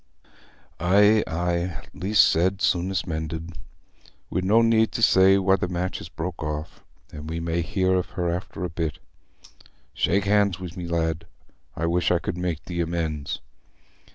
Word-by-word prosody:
"Aye, 105 Hz, +4 st, +5 dB
aye; 85 Hz, +1 st, -1 dB
least 100 Hz, +4 st, +4 dB
said, 95 Hz, +4 st, +1 dB
soonest 90 Hz, -1 st, 0 dB
mended. 80 Hz, +1 st, -4 dB, 0.8 s
We'n 90 Hz, +2 st, -1 dB
no 115 Hz, +3 st, +5 dB
need 110 Hz, -1 st, +3 dB
to -, -, -3 dB
say 95 Hz, -1 st, +6 dB
why 95 Hz, 0 st, +3 dB
the 90 Hz, -, -2 dB
match 90 Hz, +1 st, -3 dB
is -, -, -9 dB
broke 85 Hz, +1 st, -5 dB
off, 75 Hz, 0 st, -5 dB, 0.3 s
an' 75 Hz, +1 st, -8 dB
we 80 Hz, +1 st, -3 dB
may 85 Hz, +1 st, -1 dB
hear 95 Hz, +2 st, 0 dB
of 90 Hz, -1 st, 0 dB
her 90 Hz, -1 st, 0 dB
after 90 Hz, +1 st, -5 dB
a 90 Hz, -, -2 dB
bit. 80 Hz, -2 st, -3 dB, 1.0 s
Shake 95 Hz, +4 st, +1 dB
hands 100 Hz, -2 st, +2 dB
wi' 90 Hz, -1 st, -6 dB
me, 90 Hz, -2 st, -5 dB
lad: 85 Hz, -1 st, -1 dB, 0.5 s
I 85 Hz, -, -2 dB
wish 85 Hz, +1 st, +1 dB
I 90 Hz, -, +3 dB
could 85 Hz, -, -4 dB
make 90 Hz, -3 st, -3 dB
thee 85 Hz, -1 st, -3 dB
amends." 80 Hz, -5 st, -3 dB
90 Hz, 160 wpm, -24 LUFS, 85-95 Hz, 1.0 s, say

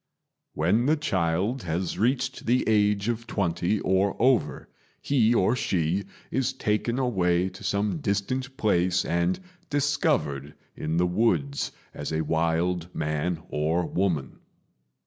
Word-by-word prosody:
When 100 Hz, -, +2 dB
the 155 Hz, -, +4 dB
child 95 Hz, -, 0 dB
has 85 Hz, 0 st, -3 dB
reached 125 Hz, +3 st, 0 dB
the 125 Hz, +2 st, +2 dB
age 105 Hz, -1 st, +2 dB
of 115 Hz, 0 st, -2 dB
twenty 95 Hz, -1 st, 0 dB
or 95 Hz, +2 st, +2 dB
over, 125 Hz, 0 st, +2 dB, 0.3 s
he 120 Hz, -5 st, +2 dB
or 115 Hz, 0 st, +3 dB
she 90 Hz, -3 st, 0 dB, 0.3 s
is 130 Hz, 0 st, 0 dB
taken 115 Hz, 0 st, -1 dB
away 95 Hz, -8 st, +1 dB
to 95 Hz, -, -13 dB
some 105 Hz, +9 st, 0 dB
distant 130 Hz, +3 st, -2 dB
place 90 Hz, -4 st, +2 dB
and 85 Hz, +2 st, 0 dB, 0.3 s
'discovered' 75 Hz, -, 0 dB, 0.2 s
in 80 Hz, +2 st, -2 dB
the 90 Hz, -, +3 dB
woods 90 Hz, -8 st, +1 dB, 0.2 s
as -, -, -5 dB
a 80 Hz, 0 st, 0 dB
wild 85 Hz, +2 st, 0 dB
man 80 Hz, +2 st, -2 dB
or 80 Hz, +4 st, 0 dB
woman." 85 Hz, -10 st, -1 dB
95 Hz, 125 wpm, -26 LUFS, 85-115 Hz, 0.3 s, the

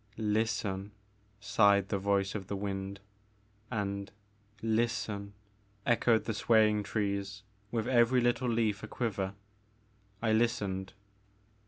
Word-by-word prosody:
Listen," 105 Hz, -2 st, -1 dB, 0.5 s
sighed 100 Hz, -1 st, +3 dB
the 100 Hz, -, 0 dB
voice 100 Hz, 0 st, +1 dB
of 95 Hz, -3 st, -5 dB
the 100 Hz, -, -3 dB
wind, 95 Hz, 0 st, -4 dB, 0.7 s
and 100 Hz, -1 st, -3 dB, 0.5 s
listen'* 110 Hz, -3 st, -1 dB, 0.5 s
echoed 120 Hz, -1 st, +3 dB
the 110 Hz, -, -1 dB
swaying 105 Hz, -1 st, +4 dB
trees 100 Hz, -1 st, -2 dB, 0.3 s
with 115 Hz, +1 st, -1 dB
every 125 Hz, 0 st, +4 dB
little 120 Hz, +1 st, +1 dB
leaf 110 Hz, -4 st, +1 dB
a 110 Hz, -, -6 dB
quiver. 100 Hz, -5 st, -2 dB, 0.8 s
I 110 Hz, 0 st, +1 dB
listened. 105 Hz, -5 st, 0 dB
105 Hz, 110 wpm, -31 LUFS, 100-115 Hz, 0.8 s, swaying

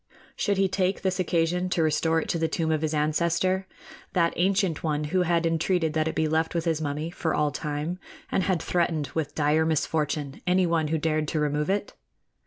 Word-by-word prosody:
Should 200 Hz, -3 st, 0 dB
he 195 Hz, 0 st, +3 dB
take 190 Hz, 0 st, -1 dB
this 190 Hz, -1 st, 0 dB
occasion 180 Hz, +1 st, +1 dB
to 170 Hz, -2 st, +1 dB
restore 160 Hz, +1 st, +2 dB
it -, -, -4 dB
to 170 Hz, -, 0 dB
the 160 Hz, -, +1 dB
tomb 160 Hz, 0 st, -1 dB
of 155 Hz, -1 st, +1 dB
his 155 Hz, -1 st, -1 dB
ancestor 170 Hz, +5 st, +1 dB, 0.5 s
that 170 Hz, -2 st, +2 dB
ancient 190 Hz, -2 st, +1 dB
one 150 Hz, -2 st, 0 dB
who 180 Hz, +5 st, +1 dB
had 170 Hz, -1 st, +1 dB
entreated 165 Hz, 0 st, +1 dB
that 155 Hz, 0 st, +1 dB
it 160 Hz, -, -3 dB
be 160 Hz, -, +1 dB
left 160 Hz, +2 st, 0 dB
with 165 Hz, 0 st, 0 dB
his 160 Hz, -2 st, 0 dB
mummy 150 Hz, +2 st, -3 dB
for 165 Hz, -2 st, -1 dB
all 150 Hz, -1 st, +1 dB
time, 150 Hz, +5 st, -3 dB, 0.3 s
and -, -, +2 dB
had 185 Hz, -2 st, 0 dB
threatened 165 Hz, -5 st, 0 dB
with 155 Hz, -3 st, -3 dB
dire 150 Hz, +1 st, +3 dB
misfortune 150 Hz, -2 st, -1 dB
anyone 170 Hz, -3 st, +2 dB
who 160 Hz, +1 st, 0 dB
dared 155 Hz, 0 st, 0 dB
to 155 Hz, -, -1 dB
remove 150 Hz, +1 st, 0 dB
it? 205 Hz, +1 st, -1 dB
160 Hz, 200 wpm, -26 LUFS, 155-180 Hz, 0.5 s, he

